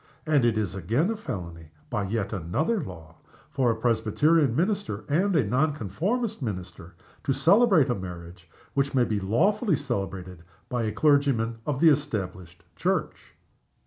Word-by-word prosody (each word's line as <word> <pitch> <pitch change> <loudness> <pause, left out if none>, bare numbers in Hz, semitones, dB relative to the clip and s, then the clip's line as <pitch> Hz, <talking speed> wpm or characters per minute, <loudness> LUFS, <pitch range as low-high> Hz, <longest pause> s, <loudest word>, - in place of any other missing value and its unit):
And 150 -4 +3
it 115 -2 +2
is 105 -5 -1
again 115 - 0
felony 85 - -7 0.2
(by 105 - -1
yet 105 0 -2
another 140 - -1
law) 80 -3 -11 0.3
for 135 -4 +1
a 115 - +1
Presbyterian 120 +5 +2
minister 160 - -1
and 180 +6 +1
a 140 -8 +3
Non 135 +8 +1
conformist 200 - -2
minister 90 -6 -6 0.3
to 135 - +1
celebrate 175 - +4
a - - +3
marriage 90 -3 -9 0.2
which 140 0 0
may 125 - +4
be 105 -2 -1
lawfully 180 - +2
celebrated 95 - -4 0.3
by 120 -2 -1
a 110 - -1
clergyman 130 -4 +2
of 140 -3 -1
the 165 - +8
Established 100 - -2
Church. - - -2
115 Hz, 145 wpm, -26 LUFS, 95-150 Hz, 0.3 s, the